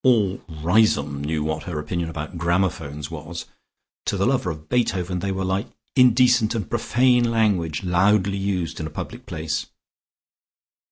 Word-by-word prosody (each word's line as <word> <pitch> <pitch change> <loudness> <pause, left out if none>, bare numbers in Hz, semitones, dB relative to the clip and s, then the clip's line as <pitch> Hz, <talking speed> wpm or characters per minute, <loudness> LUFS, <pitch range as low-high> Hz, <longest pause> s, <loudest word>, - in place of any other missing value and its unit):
All 105 -7 +3
Riseholme 80 -4 +2
knew 75 0 -1
what 80 0 -3
her 85 -4 -4
opinion 80 +3 -3
about 80 +1 -6
gramophones 85 -4 -1
was; 80 +2 -6 0.6
to - - 0
the - - +1
lover - - +1
of 75 -1 -7
Beethoven 90 -6 0
they 100 +2 -2
were 95 0 -2
like 95 +4 -1 0.3
indecent 125 -3 +5
and 105 -5 -2
profane 120 +1 +2
language 100 -9 +1
loudly 100 +2 +2
used 95 -4 -2
in 80 - -3
a - - -7
public 75 - -7
place. 80 0 -3
90 Hz, 150 wpm, -23 LUFS, 80-105 Hz, 0.6 s, indecent